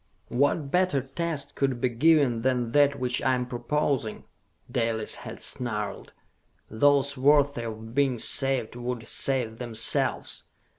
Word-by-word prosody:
"What 140 Hz, +2 st, 0 dB
better 180 Hz, -6 st, +2 dB
test 145 Hz, +3 st, -3 dB
could 135 Hz, -3 st, -1 dB
be 125 Hz, -, +1 dB
given 135 Hz, -2 st, +3 dB
than 125 Hz, -2 st, 0 dB
that 140 Hz, 0 st, +3 dB
which 125 Hz, -1 st, -1 dB
I 130 Hz, -, +2 dB
am 125 Hz, 0 st, -2 dB
proposing?" 125 Hz, -2 st, -2 dB, 0.5 s
Dalis 115 Hz, -2 st, 0 dB
had -, -, -9 dB
snarled. 105 Hz, -5 st, -3 dB, 0.6 s
"Those 140 Hz, +4 st, +3 dB
worthy 140 Hz, -2 st, +3 dB
of 110 Hz, 0 st, -7 dB
being 135 Hz, -2 st, +1 dB
saved 135 Hz, -1 st, +2 dB
would 120 Hz, -1 st, -5 dB
save 125 Hz, -5 st, -1 dB
themselves! 120 Hz, -3 st, 0 dB
130 Hz, 130 wpm, -26 LUFS, 120-140 Hz, 0.6 s, given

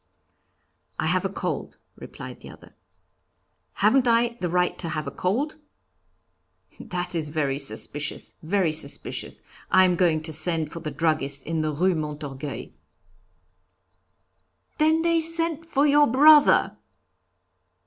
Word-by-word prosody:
'I -, -, -2 dB
have -, -, 0 dB
a -, -, 0 dB
cold,' -, -, -4 dB, 0.2 s
replied -, -, -10 dB
the -, -, -12 dB
other. -, -, -15 dB, 1.0 s
'Haven't 265 Hz, -2 st, +3 dB
I 235 Hz, 0 st, +3 dB
the 175 Hz, -, -1 dB
right 180 Hz, +1 st, +1 dB
to 170 Hz, -, -3 dB
have 155 Hz, -1 st, -3 dB
a 140 Hz, -, -5 dB
cold?' 265 Hz, +12 st, -2 dB, 1.2 s
'That 180 Hz, 0 st, -4 dB
is 160 Hz, -3 st, -2 dB
very 145 Hz, -3 st, -1 dB
suspicious, 145 Hz, +1 st, -3 dB
very 175 Hz, 0 st, +1 dB
suspicious. 155 Hz, -2 st, -3 dB, 0.3 s
I 185 Hz, 0 st, +5 dB
am 180 Hz, -1 st, +2 dB
going 165 Hz, -3 st, +1 dB
to 160 Hz, -, -1 dB
send 155 Hz, 0 st, 0 dB
for 170 Hz, -, -7 dB
the 155 Hz, -, -5 dB
druggist 150 Hz, -4 st, -1 dB
in 165 Hz, 0 st, -2 dB
the 155 Hz, 0 st, -1 dB
Rue 180 Hz, +6 st, +1 dB
Montorgueil!'" 150 Hz, -3 st, -6 dB, 2.1 s
"Then 315 Hz, +1 st, +3 dB
they 335 Hz, -1 st, +2 dB
sent 330 Hz, 0 st, -1 dB
for 290 Hz, -2 st, +2 dB
your 295 Hz, 0 st, +5 dB
brother?" 295 Hz, +4 st, +5 dB
175 Hz, 130 wpm, -24 LUFS, -, 2.1 s, I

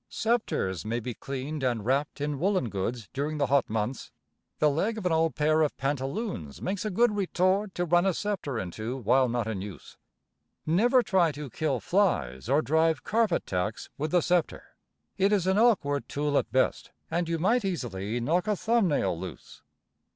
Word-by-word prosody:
Sceptres 215 Hz, -, -1 dB
may 115 Hz, +2 st, -2 dB
be 120 Hz, +1 st, -5 dB
cleaned 140 Hz, +5 st, -5 dB
and 120 Hz, -5 st, -1 dB
wrapped 140 Hz, +4 st, 0 dB
in 145 Hz, -1 st, -2 dB
woolen 185 Hz, -, +1 dB
goods 105 Hz, +3 st, -3 dB
during 145 Hz, +3 st, -2 dB
the 145 Hz, -, +2 dB
hot 140 Hz, +1 st, +2 dB
months. 110 Hz, +4 st, -3 dB, 0.5 s
The 155 Hz, -, +3 dB
leg 190 Hz, +10 st, 0 dB
of 210 Hz, -, -6 dB
an 180 Hz, -, +2 dB
old 160 Hz, 0 st, +2 dB
pair 155 Hz, +1 st, +2 dB
of 150 Hz, -, 0 dB
pantaloons 135 Hz, -, -3 dB
makes 190 Hz, +1 st, -3 dB
a 215 Hz, -, -1 dB
good 215 Hz, +2 st, +2 dB
retort 190 Hz, +1 st, +1 dB
to 175 Hz, -, 0 dB
run 175 Hz, +2 st, +3 dB
a 190 Hz, -, +2 dB
sceptre 190 Hz, -, -3 dB
into 110 Hz, +6 st, -4 dB
while 130 Hz, +2 st, +3 dB
not 120 Hz, -1 st, -1 dB
in 105 Hz, -4 st, -3 dB
use. 95 Hz, -8 st, -9 dB, 0.7 s
Never 240 Hz, +10 st, +4 dB
try 180 Hz, -7 st, +3 dB
to 145 Hz, -3 st, -7 dB
kill 150 Hz, -5 st, -1 dB
flies 110 Hz, -, 0 dB
or 145 Hz, +3 st, +3 dB
drive 160 Hz, +2 st, +2 dB
carpet 220 Hz, -5 st, +1 dB
tacks 95 Hz, +4 st, -3 dB
with 155 Hz, +2 st, -2 dB
the 175 Hz, +2 st, +3 dB
sceptre. 175 Hz, 0 st, -1 dB, 0.4 s
It 195 Hz, +2 st, +3 dB
is 200 Hz, -4 st, +2 dB
an 190 Hz, +2 st, +2 dB
awkward 180 Hz, -, +2 dB
tool 145 Hz, 0 st, -1 dB
at 115 Hz, -, -5 dB
best, 130 Hz, +2 st, +1 dB, 0.2 s
and 170 Hz, 0 st, -1 dB
you 165 Hz, -, 0 dB
might 225 Hz, +8 st, +2 dB
'easily 120 Hz, -, -3 dB
knock 170 Hz, -, 0 dB
a 210 Hz, -, +2 dB
thumb 230 Hz, 0 st, +2 dB
nail 100 Hz, -, +1 dB
loose. 90 Hz, +2 st, -9 dB
150 Hz, 185 wpm, -28 LUFS, 120-185 Hz, 0.7 s, Never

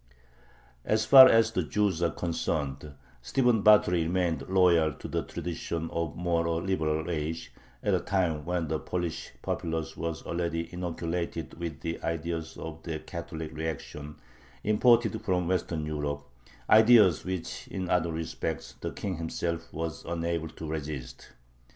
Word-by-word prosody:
As 110 Hz, 0 st, +1 dB
far 130 Hz, +1 st, +11 dB
as 115 Hz, 0 st, +4 dB
the 95 Hz, -, 0 dB
Jews 95 Hz, +2 st, 0 dB
are 85 Hz, -, +3 dB
concerned, 75 Hz, -5 st, -3 dB, 0.3 s
Stephen 120 Hz, -, +2 dB
Batory 100 Hz, -5 st, +5 dB
remained 80 Hz, -4 st, -1 dB
loyal 85 Hz, -5 st, +4 dB
to -, -, -8 dB
the -, -, -1 dB
traditions 85 Hz, -1 st, -4 dB
of 85 Hz, -3 st, -2 dB
a -, -, -17 dB
more 85 Hz, -1 st, 0 dB
liberal 80 Hz, -4 st, -1 dB
age, 80 Hz, -1 st, -3 dB, 0.3 s
at -, -, +2 dB
a -, -, +3 dB
time 85 Hz, -6 st, 0 dB
when 85 Hz, 0 st, -1 dB
the 80 Hz, 0 st, -1 dB
Polish 85 Hz, -2 st, -3 dB
populace 80 Hz, -1 st, -3 dB
was 80 Hz, -1 st, -4 dB
already 85 Hz, -1 st, -3 dB
inoculated 85 Hz, -3 st, -3 dB
with 85 Hz, -4 st, -5 dB
the 80 Hz, 0 st, -4 dB
ideas 80 Hz, 0 st, -3 dB
of 80 Hz, 0 st, -7 dB
the 80 Hz, -1 st, -4 dB
"Catholic 80 Hz, -1 st, -7 dB
reaction" 75 Hz, -1 st, -5 dB, 0.5 s
imported 110 Hz, +1 st, +3 dB
from 90 Hz, -5 st, 0 dB
Western 85 Hz, -4 st, -1 dB
Europe 75 Hz, -1 st, -3 dB, 0.4 s
ideas 110 Hz, -5 st, +6 dB
which 95 Hz, -2 st, -5 dB
in 95 Hz, -2 st, -4 dB
other 85 Hz, -1 st, +1 dB
respects 80 Hz, 0 st, -4 dB
the -, -, -2 dB
King 95 Hz, -4 st, -4 dB
himself 85 Hz, 0 st, -3 dB
was 80 Hz, 0 st, -4 dB
unable 85 Hz, -1 st, -2 dB
to 80 Hz, -, -9 dB
resist. 75 Hz, -6 st, -6 dB
85 Hz, 145 wpm, -29 LUFS, 80-90 Hz, 0.5 s, far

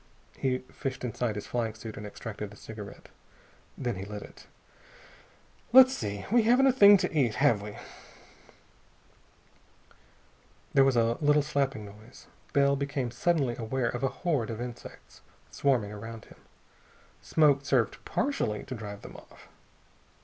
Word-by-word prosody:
He 130 Hz, -1 st, 0 dB
fished 135 Hz, -3 st, -5 dB
inside 120 Hz, -2 st, -2 dB
his 105 Hz, -, -5 dB
flying 115 Hz, -3 st, -2 dB
suit 110 Hz, 0 st, -8 dB
and 105 Hz, -, -7 dB
extracted 105 Hz, -1 st, -7 dB
a -, -, -13 dB
cigarette. 105 Hz, -2 st, -10 dB, 0.7 s
Then 120 Hz, -6 st, -3 dB
he 95 Hz, -, -5 dB
lit 105 Hz, 0 st, -7 dB
it. -, -, -15 dB, 1.3 s
"Let's 260 Hz, 0 st, +9 dB
see.... 100 Hz, -2 st, -4 dB
We 240 Hz, +1 st, +5 dB
haven't 245 Hz, +4 st, +4 dB
a 270 Hz, -, +6 dB
thing 205 Hz, -5 st, +8 dB
to 180 Hz, -2 st, -2 dB
eat, 125 Hz, -7 st, +2 dB
have 110 Hz, -1 st, +3 dB
we?" 105 Hz, 0 st, -8 dB, 3.0 s
There 135 Hz, -, +6 dB
was 135 Hz, -1 st, +3 dB
a 115 Hz, 0 st, +2 dB
little 150 Hz, 0 st, +4 dB
slapping 135 Hz, -6 st, -1 dB
noise. 105 Hz, +5 st, -14 dB, 0.3 s
Bell 140 Hz, 0 st, +3 dB
became 140 Hz, -3 st, -2 dB
suddenly 135 Hz, -2 st, 0 dB
aware 120 Hz, +2 st, -1 dB
of 120 Hz, -, -4 dB
a 135 Hz, -, +1 dB, 0.2 s
horde 145 Hz, -10 st, +1 dB
of 115 Hz, -1 st, -5 dB
insects 120 Hz, -1 st, -9 dB, 0.3 s
swarming 125 Hz, -7 st, +1 dB
around 110 Hz, +1 st, -8 dB
him. -, -, -18 dB, 0.8 s
Smoke 145 Hz, -3 st, +3 dB
served 130 Hz, -5 st, 0 dB
partially 110 Hz, -, -1 dB
to -, -, -7 dB
drive 105 Hz, -4 st, -8 dB
them -, -, -10 dB
off. -, -, -17 dB
120 Hz, 145 wpm, -29 LUFS, 110-140 Hz, 3.0 s, Let's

